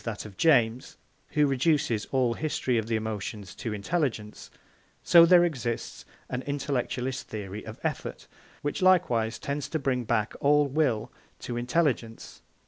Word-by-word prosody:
that 110 -2 -5
of 105 -2 -10
James, 125 - +2 0.4
who 150 -1 +4
reduces 135 -5 +1
all 130 -3 +1
the - - -11
history 145 -5 -1
of 110 - -4
the 115 - 0
emotions 105 -2 -4
to 115 - -5
intelligence, 105 - -3 0.5
so 170 -1 +7
there 175 0 +7
exists 125 -8 -4 0.2
an 125 - -3
intellectualist 130 -2 -2
theory 105 -1 -6
of - - -9
effort, - - -4 0.4
which 145 +7 -2
likewise 120 -12 +3
tends 140 0 -4
to 160 - -1
bring 135 -4 -1
back, 110 -2 0
all 145 +1 +4
will 135 -6 0 0.3
to 120 - -6
intelligence. 120 -2 -1
125 Hz, 145 wpm, -27 LUFS, 110-145 Hz, 0.5 s, so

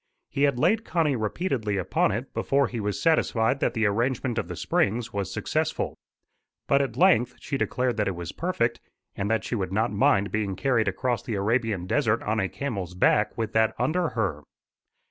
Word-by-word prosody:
He 140 - -2
had 130 - -4
laid 220 - +2
Connie 160 -9 +1
repeatedly 110 - -1
upon 90 - +1
it - - -4
before 140 0 +2
he 120 -1 -4
was 105 -1 -2
satisfied 120 -8 +2
that - - 0
the 110 -1 +1
arrangement 120 +3 0
of - - -3
the - - -6
springs, 115 +4 0
&c., 125 - -12
was 100 -2 -2
successful. - - -1 0.7
But 140 0 +4
at 130 -4 -3
length 150 -9 +4
she 140 - -4
declared 125 -3 0
that 105 - +1
it 95 - -1
was 85 -2 -6
perfect, 120 -10 -1 0.4
and 100 +1 -2
that 110 -1 +1
she 110 - -5
would 95 -5 -2
not 110 +4 +1
mind 100 0 +3
being 105 -3 -1
carried 115 +1 +1
across 120 +5 -1
the 115 - -4
Arabian 105 -2 0
desert 115 0 +1
on 110 +1 0
a 95 -2 0
camel's 100 -11 -4
back 105 +3 +2
with 110 -2 -2
that 110 0 +2
under 160 +7 +1
her. 90 -9 -1
115 Hz, 195 wpm, -26 LUFS, 100-130 Hz, 0.7 s, But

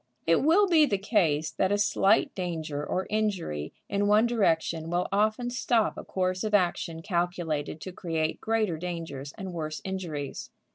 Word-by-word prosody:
It 165 0 +4
will 345 +8 +5
be 320 -4 +5
the 200 - +1
case 165 -7 +1
that 190 +4 0
a 205 - +3
slight 205 +1 +3
danger 160 -5 -3
or 185 +5 -2
injury 185 - -1 0.2
in 205 0 0
one 210 +2 +5
direction 165 -8 +1
will 175 +1 0
often 215 +4 +1
stop 240 -3 +1
a - - -7
course 185 0 -1
of 215 -1 +1
action 170 -3 0
calculated 170 -5 -2
to 185 - -6
create 160 -3 -2
greater 220 -7 0
dangers 165 -5 -5
and 190 -2 -6
worse 155 -2 -4
injuries. 175 -8 -5
185 Hz, 160 wpm, -28 LUFS, 160-210 Hz, 0.2 s, will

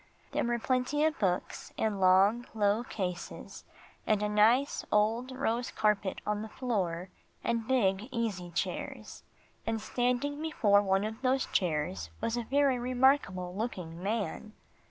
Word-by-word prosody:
There - - 0
were 240 0 0
plenty 255 +5 0
of 315 0 0
books 180 -3 -2
in 215 -3 0
long, 195 +6 +4
low 210 +2 +2
cases, 180 -7 -5 0.4
and 210 -1 +2
a 210 - 0
nice 225 +7 +3
old 220 +4 +2
rose 245 -2 -1
carpet 210 -3 0
on 210 0 -1
the 220 - -6
floor, 185 -9 -2 0.3
and 230 -1 -1
big 210 -5 +2
easy 215 -8 -2
chairs. 170 - -4 0.5
And 225 0 0
standing 250 +6 -1
before 215 -11 +3
one 195 0 +1
of 220 +3 -5
those 265 0 +2
chairs 150 - -1
was 230 - -1
a 240 - -1
very 275 0 +2
remarkable 245 -8 +2
looking 180 -7 -4
man. 215 +1 -3
220 Hz, 140 wpm, -30 LUFS, 195-245 Hz, 0.5 s, long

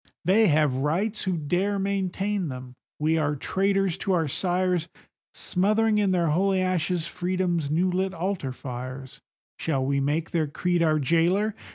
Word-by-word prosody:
They 210 +4 +5
have 150 -5 +2
rights 185 +12 -1
who 185 -2 0
dare 180 +7 0
maintain 195 0 -1
them; 130 -2 -7 0.2
we 160 +2 +1
are 150 -1 0
traitors 195 +3 0
to 195 - 0
our 165 -3 +1
sires, 180 +2 0 0.4
Smothering 210 +3 +1
in 205 -2 +2
their 175 -3 +2
holy 190 +4 +2
ashes 180 -2 0
Freedom's 175 -3 -1
new 175 +5 +1
lit 190 +1 0
altar 175 -5 -2
fires; 130 +1 -7 0.4
Shall 135 -5 -1
we 140 +1 +1
make 150 +4 -1
their 160 -3 +1
creed 175 +4 0
our 155 -2 +3
jailer? 170 +8 +2
175 Hz, 155 wpm, -26 LUFS, 150-190 Hz, 0.4 s, They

